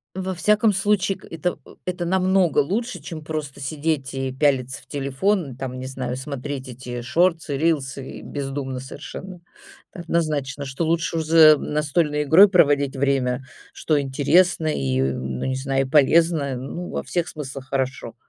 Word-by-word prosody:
во 190 0 -3
всяком 210 +4 +3
случае, 195 0 +1
к - - -20
это 165 +2 -3 0.3
это 180 -1 -2
намного 185 -1 +2
лучше, 230 - 0
чем 155 -3 -8
просто 150 -3 -5
сидеть 145 0 -2
и 135 0 -2
пялиться 130 -2 0
в - - -22
телефон, 140 +2 -1
там 130 -1 -5
не 130 - -5
знаю, 130 -2 -4
смотреть 140 0 -5
эти 125 0 -7
шортсы, 165 +4 +1
рилсы, 140 -4 -1
и - - -11
бездумно 135 -2 -4
совершенно. 165 +7 -9 0.5
Это - - -9
однозначно, 150 -5 -1
что 135 +5 -3
лучше 165 +1 0
уж 160 - -1
за 155 -1 +7
настольной 150 0 0
игрой 175 +8 +8
проводить 145 -6 +3
время, 135 -2 0 0.3
что 155 -2 0
интересно 155 +5 +2
и, 65 - 0
ну, 65 -1 -2
не 130 0 -1
знаю, 135 0 0
и - - -12
полезно, 155 -1 +3
ну, 140 +8 -6
во - - -3
всех 175 -2 -2
смыслах 135 -3 -7
хорошо. 130 -3 -2
145 Hz, 155 wpm, -23 LUFS, 135-170 Hz, 0.5 s, игрой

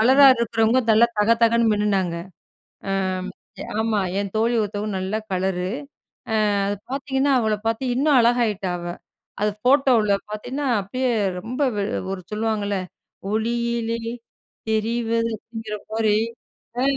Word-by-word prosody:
கலரா 265 +5 +7
இருக்குறவங்க 230 +1 +2
நல்லா 235 +2 +5
தகதகன்னு 230 +1 +4
மின்னுனாங்க. 195 -5 0 0.7
ஆ, - - +1 0.9
ஆமா, 220 -2 +1 0.2
என் 200 -2 -4
தோழி 230 +2 +2
ஒருத்தவங்க 210 0 -3
நல்லா 190 +4 -2
கலரு, 185 -1 -1 0.6
அ, - - +1 0.6
பாத்தீங்கன்னா 275 0 0
அவள 220 -1 +1
பாத்து 230 +3 -1
இன்னும் 285 0 +3
அழகா 240 +1 +3
ஆயிட்டா 195 -3 -2
அவ. 175 - -7 0.6
அது 210 - +3 0.2
போட்டோவுல 255 -6 +4 0.2
பாத்தீங்கன்னா 255 +7 -4
அப்டியே 255 +6 -1 0.3
ரொம்ப 250 +7 -4
வெ 200 - 0 0.3
ஒரு 190 - -4
சொல்லுவாங்கள்ல 210 -2 -1 0.6
ஒளியிலே 235 +1 -1 0.7
தெரிவது 230 +1 0
அப்டிங்கிற 220 -1 -7 0.2
மாரி. 220 -1 +2 0.6
அ, - - +1
225 Hz, 115 wpm, -23 LUFS, 210-235 Hz, 0.9 s, கலரா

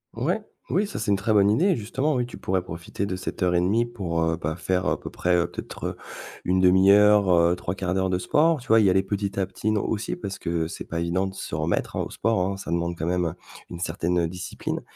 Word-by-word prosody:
Ouais, 175 - -1 0.3
oui, 200 +4 +2
ça 200 - -6
c'est 105 -1 -2
une 100 - +3
très 110 +2 0
bonne 100 -1 +5
idée, 175 - +3
justement, 130 +7 -1
oui, 125 -1 0
tu - - -10
pourrais 95 -1 -1
profiter 85 +3 -5
de 95 - -2
cette 95 - -6
heures 90 -1 +2
et - - +4
1/2 105 +6 +2
pour, 90 -8 -3
heu, 80 0 +1
bah, 80 -1 -3
faire 90 +1 -1
à - - 0
peu - - -7
près, 90 0 0
heu, 85 0 +2
peut-être, - - -7
heu, - - -5 0.5
une 95 +1 +2
1/2 95 +1 +6
heure, 100 -4 +5
3/4 90 +1 -3
d'heure 95 -1 +1
de 90 - +1
sport, 155 - +2
tu - - -15
vois? 115 +1 +6
Y 100 -3 +5
aller 95 +1 +4
petit 100 0 -3
à 95 - +1
petit, 100 +3 -2
non 105 - +1
aussi 110 0 -2
parce 100 -4 -6
que 85 -2 -2
c'est - - -7
pas 85 - -4
évident 85 +3 0
de 95 - -5
se 95 - -6
remettre, 80 +2 -1
hein, - - 0
au - - -5
sport, 105 -5 +1
hein, 95 0 -3
ça 95 - -8
demande 85 0 -1
quand 80 0 -3
même 90 -2 0 0.4
une 85 - -6
certaine 85 0 0
discipline 90 +1 -5
95 Hz, 255 wpm, -25 LUFS, 85-105 Hz, 0.5 s, 1/2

